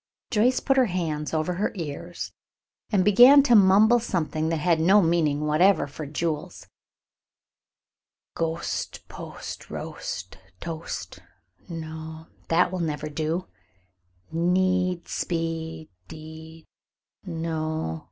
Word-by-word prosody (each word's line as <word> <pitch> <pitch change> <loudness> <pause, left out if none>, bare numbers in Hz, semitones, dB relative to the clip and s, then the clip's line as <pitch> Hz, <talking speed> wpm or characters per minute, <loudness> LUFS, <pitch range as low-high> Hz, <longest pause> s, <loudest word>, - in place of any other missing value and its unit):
Joyce 245 +3 +3
put 270 -1 +1
her 255 -2 +5
hands 160 -5 -2
over 160 +2 0
her 195 +4 -1
ears 170 0 -6 0.6
and 195 -4 +3
began 245 +7 +8
to 245 - +3
mumble 210 +3 +6
something 160 -7 -1
that 165 - +1
had 165 +1 +2
no 190 +6 +5
meaning 165 -5 +2
whatever 155 +4 +3
for 145 +1 -8
Jules: 155 +1 -4 1.7
"Ghost 165 0 -3
post - - -8
roast - - -6 0.2
toast, 165 -1 -6 0.5
no 160 -1 -7 0.2
that 170 +2 +3
will 185 - -3
never 155 -2 -2
do; 160 +4 -2 0.9
need 180 +1 +1
speed 165 -1 -3 0.2
deed, 160 +1 -11 0.6
no! 160 - -3
165 Hz, 105 wpm, -25 LUFS, 160-185 Hz, 1.7 s, began